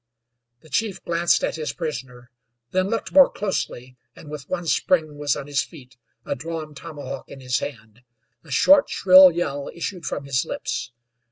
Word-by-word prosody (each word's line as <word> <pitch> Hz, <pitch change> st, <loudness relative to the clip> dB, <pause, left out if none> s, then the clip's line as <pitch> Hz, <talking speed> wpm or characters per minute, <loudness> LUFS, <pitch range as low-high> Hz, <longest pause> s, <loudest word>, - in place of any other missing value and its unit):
The 155 Hz, -, -18 dB
chief 200 Hz, +7 st, -2 dB
glanced 170 Hz, 0 st, +2 dB
at -, -, -1 dB
his 155 Hz, -1 st, -3 dB
prisoner; 130 Hz, -6 st, -6 dB, 0.4 s
then 185 Hz, +1 st, +1 dB
looked 230 Hz, -, -2 dB
more 280 Hz, -1 st, +7 dB
closely, 130 Hz, -10 st, -4 dB, 0.2 s
and 150 Hz, -, -12 dB
with 145 Hz, -3 st, -8 dB
one 175 Hz, -2 st, -3 dB
spring 155 Hz, -3 st, +1 dB
was 145 Hz, -2 st, +1 dB
on 140 Hz, -, -6 dB
his 140 Hz, -3 st, 0 dB
feet, 130 Hz, -7 st, -12 dB, 0.3 s
a -, -, -1 dB
drawn 155 Hz, +2 st, -6 dB
tomahawk 140 Hz, -2 st, -8 dB
in 135 Hz, -, -10 dB
his 125 Hz, 0 st, -1 dB
hand. 110 Hz, -4 st, -8 dB, 0.4 s
A 160 Hz, -, -17 dB
short, 280 Hz, -, +5 dB
shrill 185 Hz, 0 st, +8 dB
yell 145 Hz, -5 st, -3 dB
issued 175 Hz, 0 st, -5 dB
from 140 Hz, -, -3 dB
his 135 Hz, -2 st, 0 dB
lips. -, -, -4 dB
150 Hz, 170 wpm, -23 LUFS, 135-175 Hz, 0.4 s, shrill